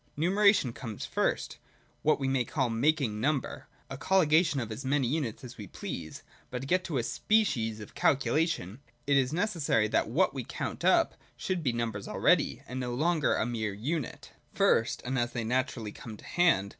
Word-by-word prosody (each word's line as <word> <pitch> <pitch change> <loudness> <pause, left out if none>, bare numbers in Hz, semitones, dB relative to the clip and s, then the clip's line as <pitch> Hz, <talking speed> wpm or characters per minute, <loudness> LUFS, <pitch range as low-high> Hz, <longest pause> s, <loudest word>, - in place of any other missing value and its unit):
Numeration 185 - +3
comes 110 -5 -6
first: - - -1 0.4
what 155 - +2
we 135 - -1
may 135 -2 +2
call, 130 -1 -1
making 120 -3 +1
number; 145 0 -1 0.2
a 135 - -7
colligation 160 -5 +3
of 115 -3 -4
as 110 +5 -6
many 135 -1 +1
units 140 -3 -2
as 125 -1 -10
we 105 - -7
please. - - -7 0.3
But 125 -1 -4
to - - -6
get 180 +5 0
a 135 -7 0
species 125 - +1
of 105 - -10
calculation, 140 - +1 0.3
it 140 - +3
is 135 -1 +2
necessary 165 - +1
that - - +1
what 160 +5 +2
we 135 -2 -4
count - - -5
up - - +4 0.2
should 185 -2 -2
be 135 -5 +1
numbers 115 -4 -3
already, - - +2
and 130 +1 -5
no 125 -1 -3
longer 160 +2 +2
a - - 0
mere 110 -3 -2
unit. 140 +6 -4 0.2
First, - - +2
and 130 +1 -1
as 120 0 -1
they 120 - -2
naturally 120 -2 -1
come 110 -2 -9
to - - -15
hand. 165 - +2
130 Hz, 180 wpm, -29 LUFS, 115-155 Hz, 0.4 s, up